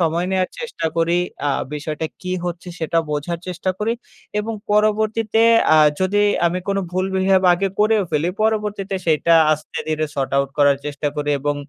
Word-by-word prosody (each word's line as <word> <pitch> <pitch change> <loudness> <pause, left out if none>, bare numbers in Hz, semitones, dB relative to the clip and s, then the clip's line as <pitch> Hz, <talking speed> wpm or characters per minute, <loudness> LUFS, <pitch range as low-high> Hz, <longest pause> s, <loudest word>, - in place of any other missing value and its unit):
সময় 170 +1 +1
নেয়ার 185 -1 0
চেষ্টা 455 - -4
করি। 170 +1 +2 0.3
আ - - +2 0.2
বিষয়টা 150 +1 -4 0.2
কী 185 0 -3
হচ্ছে? 175 0 -5
সেটা 165 +1 0
বোঝার 150 +3 -2
চেষ্টা 180 +1 -2
করি 220 +2 0 0.5
এবং 220 +2 -3 0.2
পরবর্তীতে 215 +1 +2 0.3
আ - - +6 0.2
যদি 200 +2 +2 0.2
আমি 175 +2 0
কোনো 195 0 +1
ভুল 185 +1 0
বিহেভ 190 0 +3
আগে 195 +3 0
করেও 215 0 +3
ফেলি, 155 +2 0
পরবর্তীতে 210 -2 -1
সেইটা 165 +1 +3 0.2
আস্তে 155 0 -5
ধীরে 155 0 0
sort 135 -2 -2
out 140 0 +2
করার 145 -1 +5
চেষ্টা 145 0 -2
করি 145 0 -1
এবং 145 +1 0
180 Hz, 170 wpm, -20 LUFS, 155-205 Hz, 0.5 s, আ